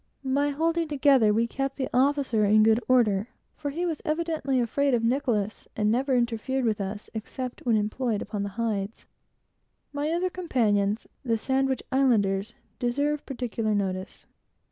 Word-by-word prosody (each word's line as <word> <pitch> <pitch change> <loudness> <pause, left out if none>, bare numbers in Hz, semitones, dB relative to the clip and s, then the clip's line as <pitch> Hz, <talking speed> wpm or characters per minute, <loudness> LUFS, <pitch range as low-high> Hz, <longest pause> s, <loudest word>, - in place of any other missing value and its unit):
By 280 +2 +1
holding 330 +3 0
well - - -10
together, 270 -6 +4
we 225 +2 +2
kept 270 +3 -3
the 260 - -2
officer 265 -4 +2
in 215 +1 +5
good 220 +1 +4
order, 220 -5 +3 0.3
for 290 - -4
he 335 +5 -2
was 325 -4 -2
evidently 310 -4 0
afraid 265 +3 +1
of 230 - -1
Nicholas, 230 -4 0
and 210 0 +1
never 260 +3 +1
ordered 235 -1 0
us, 200 +2 -5
except 250 +3 -5
when 225 -2 +4
employed 215 +1 -1
upon 205 -1 -4
the 200 - -2
hides. 215 -2 -2 0.9
My 290 +1 -1
other 350 +2 0
companions, 220 - 0 0.2
the 230 -3 +1
Sandwich 265 +2 0
Islanders, 225 -5 +2 0.2
deserve 285 +4 -1
particular 235 -5 -2
notice. 190 -2 -3
245 Hz, 150 wpm, -26 LUFS, 215-280 Hz, 0.9 s, in